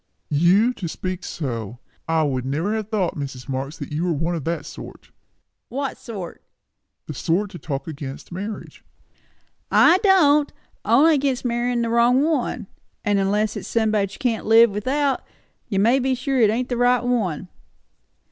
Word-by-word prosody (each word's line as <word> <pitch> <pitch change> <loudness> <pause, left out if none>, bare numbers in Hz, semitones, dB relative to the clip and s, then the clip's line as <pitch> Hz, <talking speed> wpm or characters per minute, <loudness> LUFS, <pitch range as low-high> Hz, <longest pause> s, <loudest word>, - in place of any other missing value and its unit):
"You 185 +11 +4
to 180 - -4
speak 185 +2 -5
so!" 165 - -6 0.7
said - - +1
Tom. 155 -4 +2
"I 130 - -1
never 145 +9 -2
should - - 0
have 215 -1 -5
thought, 200 -6 -1
Mrs. 135 -4 -6
Marx, 135 +2 -4
you 150 +3 -3
were 180 - 0
one 165 +3 -1
of 160 -5 -4
that 170 +1 -2
sort." - - -11 0.6
"What 275 +1 -3
sort?" 195 -8 -8 0.6
"The 150 - -6
sort 180 +8 -1
that 175 - -10
talk 140 -3 -4
against 140 -2 -7
marriage." 200 +5 -7 0.9
"I 355 +2 +6
don't! 300 -8 +4 0.3
only 270 +10 +5
against 275 -3 0
marryin' 240 0 0
the 230 - -1
wrong 240 +3 +4
one; 275 -7 -1 0.4
and 205 -1 +2
unless 205 +2 0
it's - - -6
somebody 215 -3 +1
that 195 - -15
you - - -13
can't 240 -7 -1
live 225 0 +6
without, 265 +7 0 0.4
you 200 - -2
may 230 +7 +4
be 260 0 0
sure 260 0 0
it 215 - +5
ain't 245 +4 -1
the 245 - -1
right 245 0 +3
one." 210 -9 -1
215 Hz, 175 wpm, -22 LUFS, 170-250 Hz, 0.9 s, I